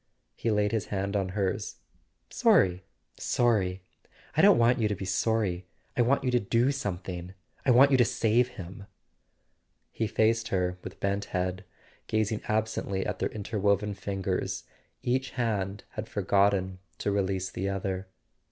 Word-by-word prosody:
He 115 - -2
laid 105 -1 +2
his 110 -3 -1
hand 100 0 -2
on 95 -2 0
hers. 95 -2 -1 0.3
" - - -46
Sorry—sorry? 95 +2 +1 0.5
I - - +4
don't - - +7
want 120 +1 +4
you 110 - +2
to 105 - -1
be 95 - -6
sorry. 95 -2 0 0.3
I 125 - +3
want 130 +4 +2
you 130 - +1
to 125 - +3
do 115 +5 +2
something—I 95 -3 -5
want 130 +3 +7
you 135 - +5
to 120 - +5
save 115 +3 +2
him!" 95 +2 -8 1.0
He 110 - -1
faced 110 +1 +2
her 90 -1 -1
with - - -9
bent 100 +1 -1
head, 90 0 -2 0.4
gazing 110 0 0
absently 110 -3 -1
at - - -3
their - - 0
interwoven 105 -1 0
fingers: 95 -1 -3 0.4
each 130 +2 0
hand 105 -4 -1
had 110 +1 -6
forgotten 100 -1 +1 0.2
to 100 - -1
release 95 -1 -1
the 95 +2 -2
other. 95 -1 -3
100 Hz, 150 wpm, -28 LUFS, 95-110 Hz, 1.0 s, don't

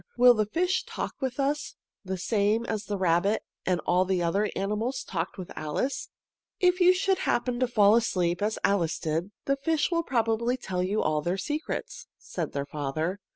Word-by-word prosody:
Will 245 0 +8
the 215 -2 0
fish 360 - 0
talk - - -5
with 260 0 -2
us, 285 +2 -1 0.3
the 190 -1 -3
same 210 +4 +1
as 215 -3 -3
the 205 - -2
rabbit 185 +3 +2 0.2
and 180 -2 +2
all 180 +1 +2
the 185 -2 0
other 200 +5 +1
animals 210 +6 -1
talked 170 +1 -4
with 185 -2 -7
Alice?" 155 - -2 0.5
"If 360 0 +3
you 355 +1 +8
should 380 +1 +1
happen 240 -4 0
to 255 - +2
fall 210 -3 +5
asleep, 180 -6 +1
as 215 +1 0
Alice 175 -5 +2
did, 160 +4 -2 0.2
the 275 0 +1
fish 310 +4 0
will 335 -1 +2
probably 235 -3 0
tell 185 -7 -3
you 195 +4 0
all 155 -1 +1
their 175 +5 -1
secrets," 310 - -4
said - - -5
her 140 0 -1
father. 155 +6 -3
210 Hz, 185 wpm, -27 LUFS, 180-260 Hz, 0.5 s, Will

